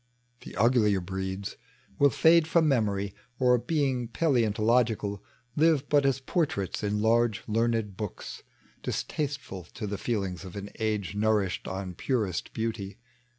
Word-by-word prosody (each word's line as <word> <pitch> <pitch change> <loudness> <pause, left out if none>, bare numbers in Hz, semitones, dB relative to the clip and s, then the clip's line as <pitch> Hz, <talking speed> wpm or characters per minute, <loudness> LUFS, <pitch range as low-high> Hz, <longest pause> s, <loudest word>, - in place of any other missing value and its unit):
The - - -11
uglier 105 -2 +3
breeds 95 +2 -4 0.4
will 140 - +6
fade 160 +5 +5
from 160 -1 +3
memory, 100 -7 +1 0.2
Or, 125 -1 +4
beii^ 130 -5 0
paleontologieal. 115 - +2 0.4
Live 155 -2 +3
irat 145 -1 +4
as 135 -1 +2
portraits 135 - -1
in 105 0 -1
large 115 -1 +2
learned 115 -2 0
books, 105 -3 -6 0.4
Distasteful 140 - -3
to - - -4
the 100 -1 -4
feelings 95 -6 -2
of 95 -1 -9
an 100 0 -6
age 105 -3 -1
Nourished 105 -2 0
on 95 -1 -4
purest 105 -3 -1
beauty. 110 -3 -4
110 Hz, 130 wpm, -28 LUFS, 100-130 Hz, 0.4 s, will